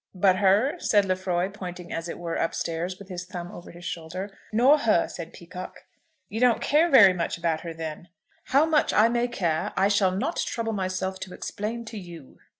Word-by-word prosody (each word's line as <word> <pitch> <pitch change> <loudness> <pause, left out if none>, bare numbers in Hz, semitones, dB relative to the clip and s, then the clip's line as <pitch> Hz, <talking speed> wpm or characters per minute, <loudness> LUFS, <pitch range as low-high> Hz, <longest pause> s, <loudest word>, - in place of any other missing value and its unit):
"But 185 0 +4
her," 210 - +3
said 205 -9 +3
Lefroy, 185 -1 0
pointing 180 -3 -7
as 165 +1 -4
it - - -5
were 170 -1 -4
up 165 - -1
stairs, 170 +3 -3
with 200 - -12
his 180 -2 -5
thumb 175 -1 -7
over 175 - -10
his 175 +1 -12
shoulder. 180 +4 -5 0.2
"Nor 255 +7 +5
her," 215 -10 +3
said 170 -1 -8
Peacocke. 180 +1 -10 0.4
"You 220 - -5
don't 245 -2 +4
care 310 +4 +3
very 200 - +8
much 170 -1 -2
about 165 -2 -1
her, 170 - -6
then?" 160 +1 -6 0.4
"How 275 +4 +4
much 315 -2 +2
I 220 +2 +5
may 240 +1 +1
care 170 -9 -1
I 195 +1 +4
shall 200 -2 +3
not 215 - -2
trouble 225 -1 -2
myself 190 -1 -2
to 185 -1 -7
explain 230 +3 -4
to 220 -1 -7
you. 170 -7 -12
185 Hz, 200 wpm, -26 LUFS, 175-220 Hz, 0.4 s, very